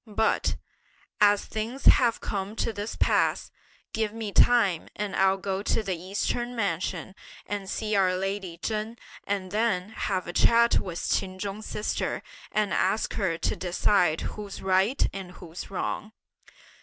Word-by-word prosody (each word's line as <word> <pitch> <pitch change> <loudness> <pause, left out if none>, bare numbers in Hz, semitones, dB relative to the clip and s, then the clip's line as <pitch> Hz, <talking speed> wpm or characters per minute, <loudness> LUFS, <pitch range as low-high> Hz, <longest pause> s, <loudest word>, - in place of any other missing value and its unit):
But, 220 +1 +1 0.6
as 205 -1 +5
things 225 +5 -4
have 240 -3 +6
come 200 +1 -3
to 230 - -1
this 205 +2 -4
pass, - - +2 0.4
give 220 -2 0
me 220 -2 -4
time 205 -8 +4
and 210 -1 -3
I'll 190 0 +4
go 195 0 -2
to 220 +1 0
the 190 -3 -1
Eastern 205 +7 -2
mansion 185 -3 -2 0.3
and 200 -2 -4
see 215 -1 -1
our 185 -2 +3
lady 195 -2 -3
Chen 215 +4 -3 0.3
and 195 -2 -2
then 210 -3 +1
have 195 -4 -2
a 175 - -6
chat 235 +3 +5
with 175 -2 -4
Ch'in 185 -1 0
Chung's 205 +2 -5
sister, 210 - -2 0.3
and 210 -4 +1
ask 195 +4 +1
her 185 -6 0
to - - -1
decide 180 -2 +2
who's 205 -2 -6
right 190 +7 +3
and 190 -2 -7
who's 170 -1 -9
wrong!" 210 +2 -3
200 Hz, 150 wpm, -27 LUFS, 185-215 Hz, 0.6 s, have